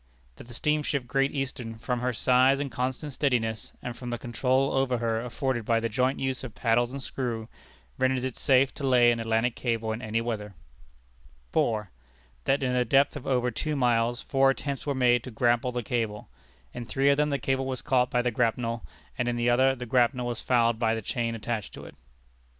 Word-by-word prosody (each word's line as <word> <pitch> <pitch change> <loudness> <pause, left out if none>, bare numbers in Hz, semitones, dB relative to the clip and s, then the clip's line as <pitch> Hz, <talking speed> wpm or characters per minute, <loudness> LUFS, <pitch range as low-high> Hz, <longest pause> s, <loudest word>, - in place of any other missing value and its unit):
That - - -12
the 120 - -9
steamship 150 -2 0
Great 135 +3 +1
Eastern, 130 -5 -4
from 120 +2 -2
her 125 +1 0
size 130 +3 +3
and 140 -2 -3
constant 130 +5 -3
steadiness, 115 -6 -1
and 125 - -5
from 125 -1 -7
the 120 - -2
control 130 +3 0
over 135 -2 +1
her 115 -1 -1
afforded 125 0 -2
by 115 +1 +2
the 115 0 -2
joint 130 +5 +1
use 130 -1 -2
of 120 -5 -8
paddles 120 +1 +1
and 135 0 -6
screw, 115 -5 -4 0.5
renders 130 -1 +1
it 130 -2 -3
safe 135 0 +3
to 145 - -9
lay 125 -3 +5
an 115 - -1
Atlantic 115 +1 0
Cable 115 -2 -1
in 110 +2 -4
any 110 -1 -1
weather. 105 -4 -4 1.0
4. 105 -3 0 0.5
That 135 +1 +2
in 125 -1 0
a 125 - +3
depth 135 +5 +3
of 145 - -7
over 125 -2 +1
two 155 +6 -2
miles 120 -2 +1
four 135 0 +3
attempts 140 +1 -3
were 140 - 0
made 120 -2 +3
to - - -7
grapple 120 +1 +1
the 120 -1 -3
cable. 110 - -3 0.4
In 120 - -6
three 135 +4 +1
of 140 - +4
them 150 0 +2
the 140 - 0
cable 135 +1 -1
was 130 -1 -4
caught 125 -3 +2
by 125 0 +1
the 125 - +1
grapnel, 115 +1 -1 0.4
and 125 - 0
in 120 - 0
the 120 0 +2
other 130 +2 +4
the 125 -1 -6
grapnel 125 +1 +2
was 120 -2 -3
fouled 115 -2 +2
by 115 -1 +2
the 110 - -5
chain 115 +2 -2
attached 115 -1 -4
to - - -10
it. - - -11
125 Hz, 210 wpm, -27 LUFS, 115-130 Hz, 1.0 s, lay